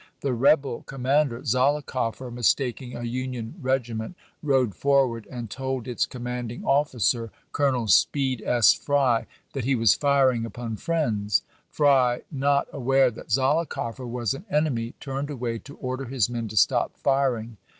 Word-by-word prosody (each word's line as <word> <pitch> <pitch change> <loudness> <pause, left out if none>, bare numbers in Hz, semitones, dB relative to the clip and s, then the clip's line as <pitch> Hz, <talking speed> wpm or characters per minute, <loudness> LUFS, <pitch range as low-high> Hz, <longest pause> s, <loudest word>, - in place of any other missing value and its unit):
The 135 -2 0
rebel 135 +1 +2
commander, 135 -1 0
Zollicoffer, 130 -2 0
mistaking 125 +1 0
a 120 - -6
Union 125 -1 -4
regi 130 -3 0
ment, 110 +10 -5 0.3
rode 130 -7 +2
forward 130 -1 +1
and 120 -3 -6
told 130 +2 -4
its 125 - 0
commanding 125 -1 -5
offi 140 -1 +1
cer. 115 +2 +1 0.2
Colonel 130 -5 +1
Speed 130 +5 +3
S. 120 -3 +5
Frj^, 135 -5 +1 0.3
that 135 - -3
he 135 +1 +2
was 115 -4 +5
firing 135 -5 +2
upon 115 -1 -5
friends. 110 -12 0 0.3
Fry, 130 -5 +3
not 140 0 +1
aware 135 -1 +3
that - - -12
Zollicoffer 130 -3 0
was 120 -3 -1
an 140 +9 -9
enemy, 135 -8 0
turned 140 +1 -4
away 120 -5 -3
to 140 +4 -12
order 130 +1 -4
his 120 -3 0
men 115 -2 -3
to 110 +1 -8
stop - - +2
firing. 125 -5 0
130 Hz, 150 wpm, -25 LUFS, 115-140 Hz, 0.3 s, S